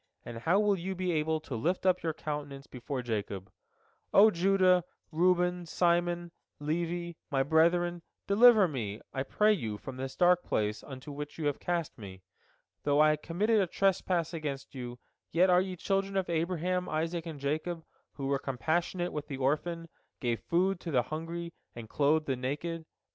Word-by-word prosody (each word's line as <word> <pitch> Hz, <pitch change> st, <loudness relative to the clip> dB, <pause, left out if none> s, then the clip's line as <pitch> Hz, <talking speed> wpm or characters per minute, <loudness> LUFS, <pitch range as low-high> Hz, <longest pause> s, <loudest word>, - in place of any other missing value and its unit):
And 115 Hz, -, -6 dB
how 170 Hz, -, +3 dB
will 205 Hz, -2 st, +2 dB
you 190 Hz, +2 st, -3 dB
be 185 Hz, 0 st, -1 dB
able 160 Hz, 0 st, +1 dB
to 145 Hz, -, -8 dB
lift 175 Hz, +11 st, -1 dB
up 185 Hz, -1 st, +3 dB
your 165 Hz, -, 0 dB
countenance 145 Hz, -3 st, -5 dB
before 125 Hz, +1 st, -5 dB
Jacob? 100 Hz, -4 st, -4 dB, 0.6 s
O 215 Hz, +2 st, +7 dB
Judah, 185 Hz, 0 st, +4 dB, 0.3 s
Reuben, 180 Hz, +1 st, +2 dB
Simon, 175 Hz, 0 st, +1 dB, 0.3 s
Levi, 170 Hz, +3 st, -2 dB, 0.2 s
my 135 Hz, -2 st, +2 dB
brethren, 170 Hz, +3 st, +3 dB, 0.2 s
deliver 215 Hz, -1 st, +7 dB
me, 110 Hz, -8 st, -4 dB
I 135 Hz, -, -1 dB
pray 210 Hz, +9 st, +3 dB
you, 110 Hz, -, -3 dB
from 130 Hz, +5 st, -8 dB
the 130 Hz, 0 st, -4 dB
dark 180 Hz, 0 st, +5 dB
place 105 Hz, 0 st, -1 dB
into 135 Hz, +1 st, -9 dB
which 145 Hz, +1 st, -7 dB
you 160 Hz, -, -3 dB
have 145 Hz, -1 st, 0 dB
cast 170 Hz, -7 st, -2 dB
me. 95 Hz, -3 st, -10 dB, 0.6 s
Though 145 Hz, 0 st, +2 dB
I 155 Hz, 0 st, +6 dB
committed 200 Hz, +8 st, +1 dB
a 190 Hz, -, +1 dB
trespass 180 Hz, -2 st, +1 dB
against 145 Hz, -4 st, -5 dB
you, 125 Hz, -2 st, -6 dB, 0.3 s
yet 180 Hz, +3 st, +4 dB
are 180 Hz, 0 st, +6 dB
ye 185 Hz, -1 st, -4 dB
children 195 Hz, +2 st, -1 dB
of 190 Hz, -, 0 dB
Abraham, 180 Hz, +2 st, -1 dB
Isaac, 165 Hz, +2 st, -2 dB
and 155 Hz, -3 st, -6 dB
Jacob, 155 Hz, +4 st, -2 dB, 0.3 s
who 140 Hz, -, -5 dB
were 135 Hz, 0 st, +1 dB
compassionate 170 Hz, +7 st, -1 dB
with 150 Hz, -1 st, -4 dB
the 140 Hz, -3 st, -5 dB
orphan, 165 Hz, +5 st, -1 dB, 0.3 s
gave 120 Hz, -3 st, -1 dB
food 185 Hz, +2 st, +1 dB
to 175 Hz, -, -6 dB
the 125 Hz, -6 st, +2 dB
hungry, 165 Hz, +4 st, -5 dB, 0.2 s
and 115 Hz, -2 st, -8 dB
clothed 150 Hz, +5 st, +2 dB
the 135 Hz, -, 0 dB
naked. 150 Hz, +6 st, -4 dB
165 Hz, 170 wpm, -30 LUFS, 140-180 Hz, 0.6 s, O